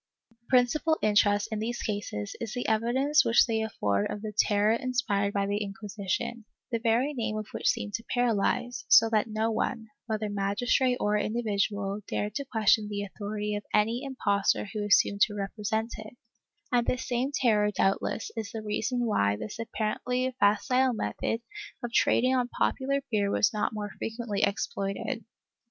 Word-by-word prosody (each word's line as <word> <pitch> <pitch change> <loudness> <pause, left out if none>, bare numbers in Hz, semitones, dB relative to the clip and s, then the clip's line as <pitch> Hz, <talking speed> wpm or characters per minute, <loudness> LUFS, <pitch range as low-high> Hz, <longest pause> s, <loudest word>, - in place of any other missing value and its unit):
^ - - -35
The 235 0 -43
principal 270 +6 +3
interest 205 0 +3
in 215 - -2
these 240 +2 -3
cases 205 - -4
is 230 -2 -4
the 245 - -2
evidence 260 +7 +3
which 230 -2 +5
they 225 -2 0
afford 105 - -1
of 210 - -5
the 215 -1 -5
terror 210 0 +3
inspired 230 -5 0
by 200 -1 0
the 205 +1 -1
Inquisition, 205 +2 -4 0.3
the 230 - 0
very 235 +5 +1
name 220 -4 -2
of 215 - -4
which - - 0
seemed 205 - -2
to 230 +2 -3
paralyze, 245 0 0
so 225 0 +6
that 215 -1 +2
no 220 +1 0
one, 220 0 -2 0.2
whether 215 -1 -1
magistrate 205 +6 +1
or 210 0 +1
individual, 205 -2 -1
dared 210 0 -2
to 280 - -3
question 220 -3 +2
the 205 -1 -3
authority 210 +1 -4
of 205 - -2
any 225 +5 +2
impostor 205 -9 0
who 210 -1 -2
assumed 200 0 +3
to 210 - -8
represent 220 +3 -2
it, 215 +3 -10 0.5
and 240 -1 +2
this 255 0 -1
same 250 +3 0
terror 215 -7 +2
doubtless 195 +1 0
is 225 -2 -4
the 220 -1 -6
reason 240 +4 -1
why 100 - +2
this 210 - -7
apparently 245 +3 -2
facile 250 +5 +3
method 230 +1 -2 0.4
of 240 -1 -4
trading 255 +2 +3
on 250 -1 +1
popular 275 +2 0
fear 205 -2 +1
was 200 -1 +2
not 210 - 0
more 210 -1 -5
frequently 225 -3 -3
exploited. 200 +4 -2
220 Hz, 170 wpm, -28 LUFS, 205-240 Hz, 0.5 s, so